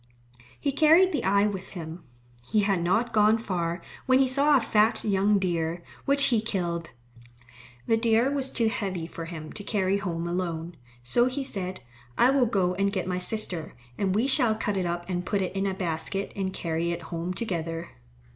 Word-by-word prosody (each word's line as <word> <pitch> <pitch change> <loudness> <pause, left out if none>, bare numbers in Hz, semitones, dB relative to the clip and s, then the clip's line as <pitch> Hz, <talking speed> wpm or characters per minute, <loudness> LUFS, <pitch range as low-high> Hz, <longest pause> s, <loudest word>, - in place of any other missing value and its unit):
He 280 - 0
carried 320 +6 +5
the 290 -8 -1
eye 200 +1 +3
with 195 -3 -3
him. 165 -1 -7 0.5
He 215 - +3
had 195 -3 +1
not 225 +8 +1
gone 215 +1 +5
far 175 -5 -3 0.2
when 255 0 +5
he 265 0 +4
saw 280 +3 +4
a - - +3
fat 220 -1 +2
young 205 0 +3
deer, 170 -2 -1 0.2
which 280 0 +3
he 220 - +3
killed. 175 -6 -3 1.0
The 225 - +3
deer 230 +3 +3
was 275 -2 -1
too 230 -3 0
heavy 190 -6 -2
for 165 0 -7
him 160 -2 -8
to 205 - -7
carry 195 -2 0
home 170 -3 -3
alone. 170 -1 -3 0.3
So 240 - +3
he 265 +2 -2
said, 185 -7 -2 0.4
"I 245 +2 +5
will 270 -3 +3
go 185 -5 +1
and 200 +2 0
get 190 -3 -2
my 180 0 -2
sister, 180 -5 -2 0.2
and 190 +3 0
we 225 +4 +2
shall 255 -5 +3
cut 210 -2 -2
it 185 -2 0
up 175 0 -3
and 180 -1 -2
put 200 +2 -1
it 185 - -4
in 195 0 0
a 190 - -2
basket 185 +2 -3
and 190 -1 -2
carry 165 -1 -2
it 170 0 -3
home 170 +2 -2
together." 165 -6 -3
195 Hz, 195 wpm, -27 LUFS, 175-225 Hz, 1.0 s, carried